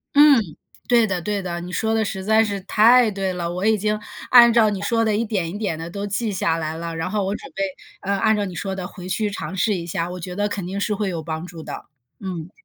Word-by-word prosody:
嗯， 290 -2 +8 0.5
对 235 -2 +5
的 185 -3 -2
对 205 +3 -2
的， 175 -2 -4
你 180 +1 -7
说 220 +3 0
得 225 0 +2
实 195 -2 -4
在 220 +2 +4
是 205 -2 -2
太 225 +5 +5
对 195 -2 -2
了， 175 -2 -3
我 180 +3 -2
已 220 0 +4
经 210 +1 0 0.3
按 240 -1 +8
照 225 -2 +5
你 200 -2 -3
说 230 +2 +1
的 215 -1 +1
一 220 - +1
点 195 -7 -2
一 195 - -5
点 200 -7 -2
地 165 +1 -6
都 200 +3 -4
记 215 +2 -2
下 165 -3 0
来 160 -1 -3
了。 165 0 -5
然 165 +2 -3
后 205 +1 0
我 195 +1 -1
准 275 - -9
备， 195 - -2 0.4
呃， 200 - -1
按 220 +2 +3
照 205 - 0
你 190 -3 -5
说 190 +2 -4
的 185 -1 -5
回 180 -2 -10
去 210 +3 -1
尝 200 -1 -5
试 210 +3 +1
一 170 -2 -4
下， 170 0 -2
我 180 0 -6
觉 180 +1 -6
得 205 +1 0
肯 195 -4 -4
定 195 +2 -3
是 210 - 0
会 205 0 -1
有 165 -3 -4
帮 160 +1 -4
助 165 -2 -9
的， - - -7 0.3
嗯。 180 -4 -6
195 Hz, 290 characters per minute, -22 LUFS, 180-215 Hz, 0.5 s, 嗯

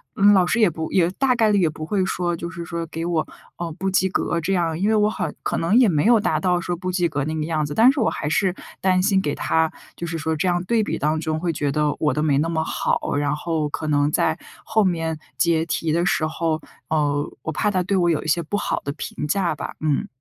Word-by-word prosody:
嗯， 205 -1 +6
老 185 -2 +4
师 235 - +1
也 215 - +6
不， 160 -1 -4
也 180 -2 +3
大 255 +4 +1
概 220 -3 +3
率 205 - +3
也 165 - +3
不 155 0 -7
会 195 +2 0
说 175 -2 -1
就 170 +1 -5
是 170 -2 -7
说 170 0 -4
给 165 +2 -5
我， 165 -3 0 0.3
呃， 170 -1 -4
不 190 +4 -4
及 190 0 +2
格 170 -2 -1
这 195 +5 -1
样。 165 -3 0
因 200 +3 +1
为 220 - +3
我 210 0 +3
很 - - -4
可 - - -1
能 170 +6 +1
也 250 -3 +6
没 155 -1 +1
有 235 -1 +6
达 210 - 0
到 180 -2 +1
说 175 0 -3
不 185 +1 -4
及 180 -1 +1
格 145 -3 -2
那 155 +1 -3
个 155 - -2
样 155 -2 -1
子， 145 - -6
但 240 +4 +7
是 275 - -3
我 220 - +3
还 150 - -4
是 185 +3 +1 0.3
担 185 -1 +3
心 195 -2 +3
给 145 -4 -2
他， 160 0 +1 0.2
就 170 - -5
是 165 0 -3
说 160 +1 -1
这 155 +4 -1
样 175 0 +1
对 225 +4 +1
比 - - -2
当 155 +2 0
中 155 0 -2
会 170 -1 -1
觉 145 -1 -1
得 150 0 0
我 150 - +2
的 150 - -1
没 145 -2 +2
那 165 +2 0
么 160 -1 0
好。 - - -1
然 145 0 0
后 155 -1 -2
可 150 - -4
能 145 -1 +2
在 160 +1 +1 0.3
后 220 -1 +2
面 165 -4 -1 0.2
结 165 -2 +2
题 165 -2 -1
的 170 +2 +1
时 175 -3 +1
候， 160 0 -1 0.3
呃， 145 -2 0
我 160 - -3
怕 210 +7 0
他 185 -3 0
对 200 +2 -1
我 175 -2 +3
有 155 - 0
一 - - -7
些 165 +2 +2
不 170 +6 -3
好 - - -2
的 140 - -3
评 150 - -5
价 185 +1 +1
吧， - - -6
嗯。 150 -2 0
170 Hz, 290 characters per minute, -22 LUFS, 155-190 Hz, 0.3 s, 但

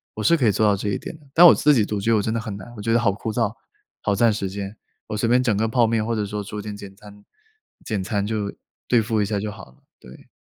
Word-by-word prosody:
我 110 - -4
是 170 +8 +4
可 125 - +2
以 - - +5
做 110 - +1
到 105 -1 +4
这 100 - -3
一 100 - -1
点， 160 - -8 0.2
但 175 - +8
我 - - +9
自 150 - +4
己 115 -6 +3
独 105 -1 -3
居 115 +3 0
我 110 - +3
真 110 +2 -2
的 115 - -1
很 110 -3 -6
难。 100 +4 -10
我 - - -7
觉 115 +2 0
得 120 - +4
好 105 -4 +2
枯 110 +2 -5
燥， 115 -2 0 0.5
好 105 - 0
占 115 +2 +4
时 105 -2 -2
间， 100 +2 -6 0.3
我 105 - -4
随 115 - 0
便 125 +2 +4
整 115 -5 +1
个 110 +2 +1
泡 120 +1 +3
面 110 -1 0
或 115 +1 -1
者 105 -1 -1
说 105 +1 -4
做 105 +1 -6
点 105 0 -7
简 100 -1 -11
餐 105 0 -15 0.6
简 105 -3 -2
餐 100 +1 -1
就 105 -1 -3 0.3
对 120 -2 +4
付 110 0 0
一 - - +1
下 105 0 -2
就 105 0 -4
好 - - -11
了， 65 - -28 0.2
对。 65 +1 -15
105 Hz, 315 characters per minute, -23 LUFS, 100-115 Hz, 0.6 s, 我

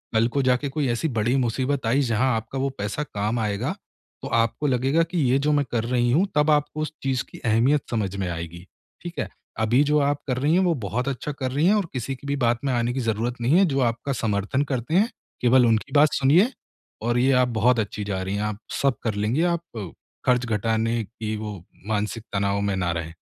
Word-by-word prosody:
कल 110 +1 +4
को 140 +3 0
जाके 130 +2 +1
कोई 145 0 -1
ऐसी 120 +7 0
बड़ी 120 +5 +1
मुसीबत 130 +2 0
आई 130 +5 +3
जहाँ 125 0 +1
आपका 110 +4 -4
वो 135 +1 0
पैसा 105 +8 -2
काम 105 -3 -2
आएगा, 105 -2 -1 0.5
तो - - -4
आपको 115 +6 +1
लगेगा 135 +5 +2
कि 170 +2 -4
ये 135 - +3
जो 150 +2 +1
मैं 145 -1 +2
कर 115 -2 0
रही 120 0 +1
हूँ 175 +10 +3
तब 150 +1 +3
आपको 150 +1 +1
उस 155 0 -3
चीज़ 130 -2 0
की - - -11
अहमियत 120 +6 +3
समझ 105 -5 -1
में 95 -2 -2
आएगी, 85 +1 -6 0.4
ठीक 175 0 -6
है? - - -2 0.3
अभी 115 +5 +3
जो 150 +1 +2
आप 145 0 +1
कर 125 -2 0
रही 145 +5 +2
हैं 185 - +4
वो 175 -2 +3
बहुत 125 +7 -2
अच्छा 140 +2 -3
कर 130 -3 -4
रही 145 +5 +1
हैं 200 - +5
और 205 -3 +1
किसी 130 +1 -3
की 140 - -12
भी 140 - 0
बात 120 0 +2
में 135 - +1
आने 120 0 0
की 135 - -2
ज़रूरत 115 +3 -1
नहीं 130 +8 +4
है 195 - +6
जो 140 -5 0
आपका 120 +4 -4
समर्थन 110 +3 0
करते 130 +5 -1
हैं, 210 +5 +4 0.3
केवल 125 0 +5
उनकी 110 -1 +1
बात 150 +1 +5
सुनिए 165 - +4 0.5
और 120 +2 0
ये 130 +2 +3
आप 125 - +2
बहुत 120 +2 +4
अच्छी 105 0 -3
जा 100 -2 -3
रही 95 +1 -3
हैं, 100 - -1
आप 105 -1 -3 0.2
सब 140 -2 +2
कर 115 - 0
लेंगी 110 +10 +1
आप 155 - -6 0.4
ख़र्च 125 -1 +3
घटाने 115 +1 0
की 110 0 -5
वो 105 -1 -5 0.3
मानसिक 105 +1 -2
तनाव 100 0 0
में 100 -1 0
ना 90 -2 0
रहे। 80 -1 -4
125 Hz, 230 wpm, -24 LUFS, 110-140 Hz, 0.5 s, है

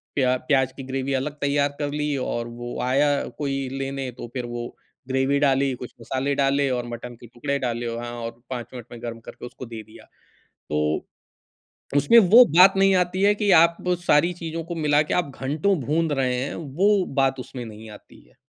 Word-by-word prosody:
प्या 130 -2 +2
प्याज 130 -2 +2
की 135 - -6
ग्रेवी 135 +1 -3
अलग 135 +3 -1
तैयार 140 0 +2
कर 145 -1 -1
ली 150 -1 -1
और 120 -2 -3
वो 120 +1 -7
आया 140 +3 +2 0.3
कोई 135 -2 -2
लेने 135 -1 -4
तो - - -7
फिर 125 -2 -3
वो 120 0 -6 0.3
ग्रेवी 135 +2 +1
डाली, 135 -1 +2
कुछ 125 0 -9
मसाले 135 +2 -2
डाले 140 0 +2
और 125 -1 -2
मटन 120 +1 -7
के 120 - -14
टुकड़े 140 +4 -3
डाले 120 -1 -2
व 115 0 -4
हाँ, 120 0 -6
और 115 0 -7
5 120 -3 -5
मिनट 120 -3 -8
में 120 -1 -10
गरम 115 -1 -5
करके - - -10
उसको 125 +1 -9
दे 115 -1 -8
दिया। 110 - -16 0.5
तो, 75 +1 -3 0.9
उसमें 145 +12 +6
वो 225 +5 +8
बात 190 +1 +8
नहीं 195 0 +4
आती 180 +1 0
है, 205 +1 +5
कि 205 -1 0
आप 170 +1 +2 0.2
सारी 170 +4 +4
चीज़ों 165 0 -4
को 170 +1 -5
मिला 150 -2 +2
के 150 - -3
आप 175 -6 0
घंटो 155 +9 +1
भूंध 160 +1 +1
रहे 130 -2 0
हैं, 140 - -4
वो 185 +6 +1 0.2
बात 135 -1 +1
उसमें 130 -1 -7
नहीं 110 0 -10
आती 105 - -15
है। - - -28
135 Hz, 200 wpm, -24 LUFS, 120-150 Hz, 0.9 s, वो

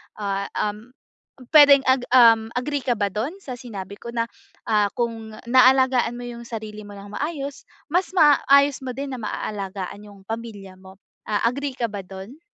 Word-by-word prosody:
Ah, 200 -1 -3
um, 210 +4 -3 0.6
puwedeng, 285 -2 +9
ag 260 -1 +3
um, 230 -3 +6
agree 280 +2 -2
ka 245 - +1
ba 200 - +2
do'n 215 - -3
sa 260 -10 -7
sinabi 200 -5 -8
ko 235 +3 -9
na, 230 -1 -1 0.4
ah, 210 -2 +3
kung 225 -2 -3 0.2
naalagaan 255 -1 +4
mo 245 - -7
'yung 235 0 -8
sarili 215 -2 -7
mo 205 - -11
ng 200 +1 -10
maayos 285 -2 -4 0.3
mas 360 +2 +1
maayos 285 -3 +5
mo 255 - -4
din 275 +1 -5
na 250 - -8
maaalagaan 200 -1 -5
'yung 205 -2 -14
pamilya 220 -4 -7
mo, 190 +1 -16 0.3
ah, 210 - 0
agree 280 +3 -2
ka 235 -2 -1
ba 205 -2 -7
do'n? 195 +9 -10
230 Hz, 170 wpm, -23 LUFS, 205-260 Hz, 0.6 s, puwedeng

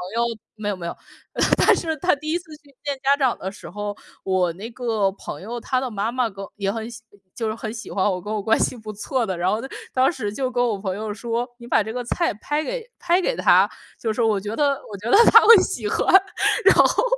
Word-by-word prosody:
友 235 - +2 0.3
没 215 -1 -4
有， 205 - -1
没 180 -2 -8
有。 - - -5 0.6
但 - - +5
是 320 -1 -2
他 355 +2 +2
第 310 +2 -5
1 340 - +2
次 330 -3 -17
去 285 -2 -24
见 285 -1 -2
家 280 +1 +4
长 265 -4 +1
的 190 - -4
时 200 - -12
候， 205 +2 -5 0.3
我 185 -2 +1
那 205 +6 -8
个 225 -5 0
朋 - - -8
友， 235 +5 -5
她 255 +2 -1
的 260 - -3
妈 210 +2 -2
妈 250 -2 0
跟 195 0 -8
也 195 -1 -1
很 225 +1 -5
喜 235 0 -10 0.3
就 225 - -2
是 215 - -2
很 225 -1 -6
喜 225 - -8
欢 190 - 0
我， 180 -1 -3
跟 210 +4 -6
我 215 - -1
关 220 +3 +2
系 255 - 0
不 215 -1 -8
错 235 +4 -2
的， 190 - -3
然 180 +2 +1
后 215 +3 0
呢， 265 - -6 0.3
当 260 +1 +4
时 215 -11 -4
就 255 +2 -2
跟 245 0 +1
我 220 -4 0
朋 190 -2 -3
友 215 0 -4
说： 235 +3 -3
“你 235 - -11
把 225 - +3
这 220 - -6
个 250 0 -3
菜 340 +7 0
拍 295 +8 -2
给 - - -5
拍 350 +1 +2
给 - - 0
她。” - - +4 0.3
就 220 -2 -1
说： 230 +1 +1
“我 205 - +1
觉 210 +3 -5
得 280 0 +1
我 200 - -6
觉 215 +5 -5
得 - - +7
她 455 - +10
会 465 - +10
喜 225 - -1
欢。” - - 0 0.6
然 - - +7
后 - - +4
225 Hz, 270 characters per minute, -22 LUFS, 205-265 Hz, 0.6 s, 她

